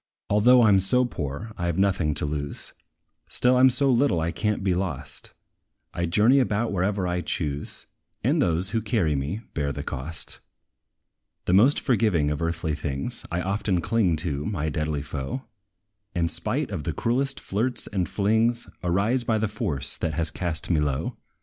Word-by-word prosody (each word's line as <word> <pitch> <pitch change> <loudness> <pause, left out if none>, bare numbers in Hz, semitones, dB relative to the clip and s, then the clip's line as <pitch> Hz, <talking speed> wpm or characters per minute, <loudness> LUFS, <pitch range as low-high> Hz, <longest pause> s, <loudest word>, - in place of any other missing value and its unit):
Although 120 +4 +6
I 110 - +6
'm 100 -1 +6
so 125 +7 +2
poor, 85 - -5
I 85 - -1
have 85 - -1
nought 100 0 +4 0.2
to - - -1
lose; 75 -1 -4 0.6
Still 125 +1 +3
I - - +4
'm 130 +1 +7
so 135 +2 +3
little 120 -8 +3
I 80 +1 0
can't 105 +4 -1
be 95 -2 +2
lost: 90 -6 -4 0.6
I 85 0 -1
journey 110 +10 +4
about 115 -2 +1
wherever 95 0 0
I 90 0 -1
choose, 75 -4 -3 0.4
And - - +2
those, 90 +2 0
who 115 0 0
carry 105 -8 +1
me, 75 +11 -3
bear 70 -2 -1
the - - -5
cost. 75 +5 -5 1.1
The 90 - +1
most 120 +10 +5
forgiving 105 - +2
of 75 - -3
earthly 85 -1 -1
things, 70 -2 -4
I 85 +1 0
often 95 -1 0
cling 100 -3 +2
to 75 -3 -2
my 80 -3 -2
deadly 75 -1 -2
foe; 70 - -4 0.7
And, 85 -2 +1
spite 120 - -2
of 90 -7 -3
the 80 - -2
cruelest 135 - 0
flirts 115 +4 0
and 95 -4 -2
flings, 110 +3 +1 0.2
Arise 100 +8 +1
by 115 -2 +1
the 110 0 0
force 80 -10 -2
that 80 -2 -2
has 80 0 0
cast 85 -1 -2
me 80 - +3
low. 70 -3 -1
95 Hz, 175 wpm, -25 LUFS, 80-110 Hz, 1.1 s, m